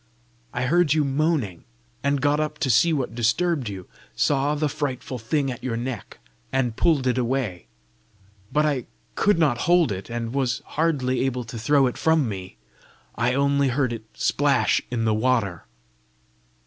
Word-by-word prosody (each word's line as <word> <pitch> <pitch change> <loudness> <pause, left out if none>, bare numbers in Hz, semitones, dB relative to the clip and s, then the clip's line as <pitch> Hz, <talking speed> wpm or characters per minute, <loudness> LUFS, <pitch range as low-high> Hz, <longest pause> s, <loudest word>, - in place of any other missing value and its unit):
I 125 - -2
heard 160 +2 +3
you 155 - +3
moaning, 140 - 0 0.4
and 140 0 +1
got 145 +1 +3
up 150 0 -2
to 135 -5 +2
see 120 +10 +4
what 135 -7 -1
disturbed 125 +4 +1
you; 95 -3 -7 0.3
saw 145 +1 +1
the 150 +1 0
frightful 135 -3 -4
thing 135 +4 0
at 125 - -8
your 115 -3 -2
neck, 120 -3 -5 0.3
and 125 -4 0
pulled 150 -3 +2
it 125 0 +1
away. 120 -8 -2 0.8
But 150 +1 +2
I 140 -5 -1 0.3
could 205 -3 +2
not 145 -8 +2
hold 175 -7 +4
it, 95 +2 -5
and 115 0 -4
was 130 -3 -1
hardly 140 -6 0
able 125 -2 -2
to 115 0 -8
throw 140 +4 +3
it 125 - -2
from 160 -4 +3
me. 95 - -7 0.6
I 125 +2 0
only 140 0 +2
heard 130 -1 0
it 110 -1 -7
splash - - +2
in 115 -2 -1
the 110 - +2
water!" 110 -7 0
130 Hz, 165 wpm, -24 LUFS, 120-150 Hz, 0.8 s, see